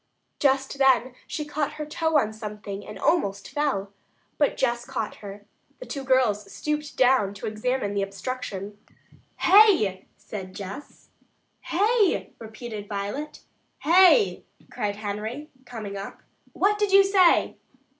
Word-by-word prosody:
Just 270 0 +1
then 260 -2 +4
she 300 - -4
caught 295 0 -2
her 305 - -5
toe 320 +1 0
in 220 -6 +1
something 210 -2 -7
and 210 - -9
almost 200 - 0
fell, 260 -10 -1 0.5
but 290 - +2
Jess 240 -2 0
caught 220 -3 -4
her. 205 0 -10 0.3
The - - -9
two 275 - -5
girls 225 -7 +1
stooped 300 -1 -4
down 250 -6 +3
to 195 - -7
examine 215 0 -2
the 200 - 0
obstruction. 200 0 -5 0.6
"Hay!" 365 - +5
said 190 -3 -8
Jess. 200 +9 -9 0.6
"Hay!" 410 +2 +1
repeated 220 -2 -8
Violet. 205 +9 -5 0.4
"Hey!" 375 +6 +5 0.3
cried 205 -1 -2
Henry, 215 +8 -5
coming 220 -5 -7
up. 195 0 -8 0.3
"What 415 +1 +1
did 415 -2 +1
you 395 0 +8
say?" 390 -3 +3
245 Hz, 130 wpm, -25 LUFS, 205-300 Hz, 0.6 s, you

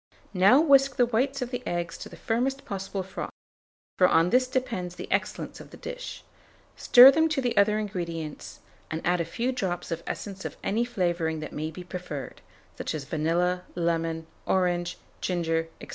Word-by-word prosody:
Now 200 +8 +6
whisk 275 -4 +5
the 245 - +4
whites 255 +3 0
of 250 - -7
the 245 -1 -3
eggs 170 -1 -2
to - - -8
the - - -11
firmest 265 +4 -1
possible 195 -1 -4
froth, 190 - -6 0.7
for 180 - +7
on 165 +1 +3
this 255 +1 +4
depends 230 -9 -2
the - - -7
excellence - - -2
of - - -11
the - - -12
dish; - - -7 0.5
stir 250 +2 +9
them 320 +3 +3
to 310 -3 0
the 245 -3 0
other 210 +1 +4
ingredients, 170 -7 -5 0.3
and 160 +1 -4
add 180 0 +2
a - - -2
few 235 +10 -2
drops 185 -10 -3
of 165 0 -2
essence 195 -2 -5
of - - -6
any 230 +4 +1
flavouring 175 -8 -1
that 155 - -7
may 155 +1 -3
be 180 +3 -9
preferred; 175 -6 -7 0.4
such - - -3
as 150 - -4
vanilla, 170 +5 0
lemon, 165 -1 -1 0.2
orange, 175 -1 +1 0.2
ginger, 165 -2 0
&c. - - -11
185 Hz, 180 wpm, -27 LUFS, 170-245 Hz, 0.7 s, stir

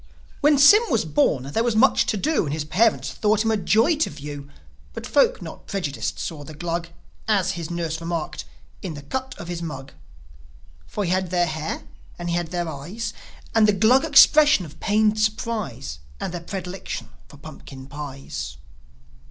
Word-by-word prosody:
When 295 0 +4
Sym 290 +11 +8
was 230 - +1
born 145 -3 +2
there 145 +12 -1
was 235 -2 0
much 255 +5 +4
to 215 - 0
do, 300 - +1
And 145 - -3
his 155 -1 -3
parents 220 +9 +2
thought 215 +1 +1
him 225 - +2
a - - +2
joy 225 - +3
to 315 - +1
view; 145 -1 -8 0.4
But - - -7
folk - - +2
not - - -10
prejudiced 175 -8 -3
saw 155 -4 -5
the 155 +2 -10
Glug, 170 +1 -3 0.4
As 205 -4 +2
his 165 -2 -5
nurse 170 -2 -3
remarked, 165 -1 -4 0.4
"In 175 -5 -5
the 145 - -9
cut 260 - -4
of 170 - -8
his 175 -1 -4
mug." 140 -4 -6 1.0
For 205 - -3
he 175 - -1
had 185 -1 0
their 175 0 +2
hair, 155 -1 -4 0.3
and 175 0 -4
he - - +1
had 175 -1 -1
their 175 0 -3
eyes, 165 +10 -5 0.4
And 220 -1 +5
the 210 - +4
Glug 225 +8 +4
expression 295 - +6
of 155 0 -13
pained 215 0 +2
surprise, 215 - -2 0.2
And 180 - -4
their 175 - -4
predilection 185 +1 -6 0.2
for 145 - -15
pumpkin 140 -3 -11
pies. 135 - -7
175 Hz, 180 wpm, -23 LUFS, 150-215 Hz, 1.0 s, Sym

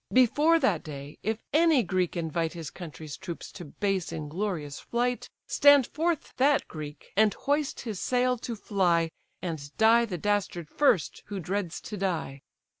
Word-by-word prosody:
Before 290 +6 +5
that 210 - +1
day, 145 -2 -8
if 220 +2 -2
any 315 -4 +5
Greek 180 -1 -1
invite 165 0 -1
His 165 -4 -6
country's 160 -4 -8
troops 170 -3 -7
to 175 - -9
base, 195 +4 -2
inglorious 155 -1 -3
flight, 245 +1 -1 0.2
Stand 285 -2 +6
forth 325 +2 -2
that 280 +2 +3
Greek! 150 -2 -9
and 215 +1 +4
hoist 290 0 -1
his 220 -6 -5
sail 250 -1 +1
to 235 0 -4
fly, 175 -6 +1 0.3
And 155 -5 -4
die 230 +2 +5
the 190 -6 -4
dastard 185 -4 -1
first, 240 - +2
who 200 -2 -4
dreads 180 0 -3
to 210 - -6
die. 170 -8 -2
195 Hz, 155 wpm, -28 LUFS, 165-245 Hz, 0.3 s, Stand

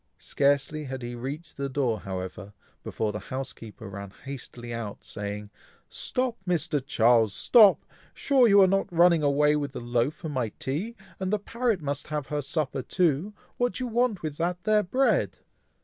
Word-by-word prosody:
Scarcely 145 +2 0
had 130 -1 -6
he 120 0 -5
reached 140 +7 -6
the 140 0 -2
door, 130 -5 0
however, 95 +1 -6 0.3
before 110 -1 -2
the 105 - -5
housekeeper 120 -4 -6
ran 100 0 -7
hastily 125 -3 -7
out, 115 -3 -6
saying, 105 0 -6 0.4
"Stop, 250 -2 -2
Mr. 165 -5 0
Charles! 115 -5 +3
stop! 215 -5 +6 0.3
sure 265 -4 +4
you 200 -2 +6
are 190 - +7
not 195 0 0
running 170 -1 +5
away 150 +1 +3
with 145 -1 -2
the - - -5
loaf 120 +4 0
for 160 - -7
my 130 -6 -1
tea, 175 - -3 0.2
and 190 0 -2
the 210 - +3
parrot 225 -3 -1
must 145 0 -3
have 150 -3 -4
her 145 - 0
supper 140 -1 -2
too. 175 +5 0 0.2
What 245 0 +1
do 255 - -4
you - - -2
want 230 -5 +1
with 150 -2 -4
that 175 +1 -2
there 215 0 +4
bread?" 255 +8 +1
145 Hz, 175 wpm, -27 LUFS, 120-185 Hz, 0.4 s, are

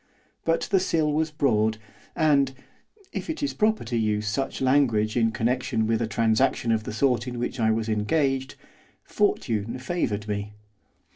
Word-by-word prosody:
But 165 0 +2
the 195 - +5
sill 160 -5 +1
was 155 +1 +1
broad, 110 -8 +1 0.4
and 140 -4 +3 0.6
if - - -5
it 320 -2 -3
is 285 - -1
proper 215 +1 +1
to 120 +1 -4
use 105 -2 0
such 135 +5 -2
language 130 -6 +2
in 115 -2 +3
connection 115 0 0
with 115 +1 +1
a 115 - 0
transaction 115 +2 +1
of 110 -1 0
the - - -4
sort 125 +2 +1
in 125 -1 -5
which 120 +2 -3
I 110 -1 +3
was 110 0 0
engaged 135 +5 0 0.5
fortune 110 +2 -1
favoured 125 -7 -2
me. 105 0 -4
120 Hz, 160 wpm, -25 LUFS, 110-140 Hz, 0.6 s, the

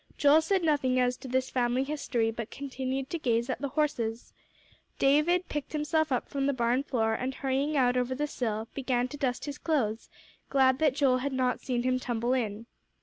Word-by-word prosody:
Joel 295 +2 +6
said 375 +3 +1
nothing 275 -5 +2
as 250 0 +2
to 265 - -10
this 260 +1 -1
family 250 +1 +1
history, 270 -6 -1
but 225 0 -6
continued 265 -1 -4
to 335 - -2
gaze 235 -2 0
at - - -4
the 280 - -1
horses. 250 -6 -2 0.6
David 305 +6 +3
picked 295 0 -5
himself 310 0 0
up 250 - 0
from 275 -1 -1
the 280 - +2
barn 240 +1 +1
floor, 225 -6 0
and 255 +3 -3
hurrying 275 +2 0
out 250 -2 +3
over 250 +1 0
the 295 +3 -1
sill, 225 -6 -3
began 255 -2 0
to 290 - -7
dust 255 -4 -1
his 290 0 -6
clothes, 235 -9 -1 0.4
glad 260 -1 +3
that 300 -4 +3
Joel 265 -3 +3
had 275 +1 -2
not 255 -1 0
seen 245 -2 -1
him 255 0 +1
tumble 240 0 -1
in. 225 -3 -2
260 Hz, 200 wpm, -29 LUFS, 245-285 Hz, 0.6 s, Joel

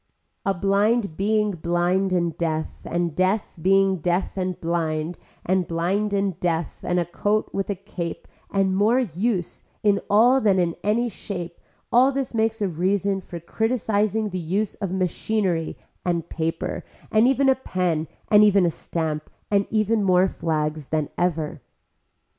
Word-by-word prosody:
A 195 - +2
blind 200 +1 +1
being 210 +2 +1
blind 175 +2 0
and 170 -3 0
deaf 160 -2 -3
and 170 -2 -1
deaf 190 +3 0
being 195 +1 +4
deaf 175 +3 -1
and 185 -2 -2
blind 165 -1 -2 0.3
and 185 -1 +1
blind 185 +5 0
and 195 -3 0
deaf 165 -2 -2
and 180 0 +1
a 175 - 0
coat 205 +5 -1
with 195 +1 -2
a 200 - 0
cape 180 -3 -6 0.2
and 195 -1 +1
more 215 +5 +3
use 195 -3 -2 0.2
in 205 -2 +4
all 245 +6 +5
than 200 -4 +3
in 175 -2 +1
any 225 +4 +2
shape 180 -5 -6 0.3
all 255 +3 +5
this 270 -2 -3
makes 225 -1 0
a - - +2
reason 190 +3 0
for 175 -1 -8
criticising 215 +2 0
the 185 -1 -3
use 190 +5 -1
of 195 -3 -4
machinery 185 -1 -1 0.3
and 170 -2 -1
paper 165 0 -3 0.3
and 220 +2 +5
even 270 +1 +3
a 265 - +7
pen 180 -10 -1 0.2
and 210 -1 +6
even 200 -3 +5
a 170 - +2
stamp 155 -2 -3 0.2
and 200 -1 +2
even 215 0 +1
more 185 -1 +4
flags 155 -4 -2
than 155 -2 -1
ever. 160 -4 -1
190 Hz, 155 wpm, -24 LUFS, 170-210 Hz, 0.3 s, a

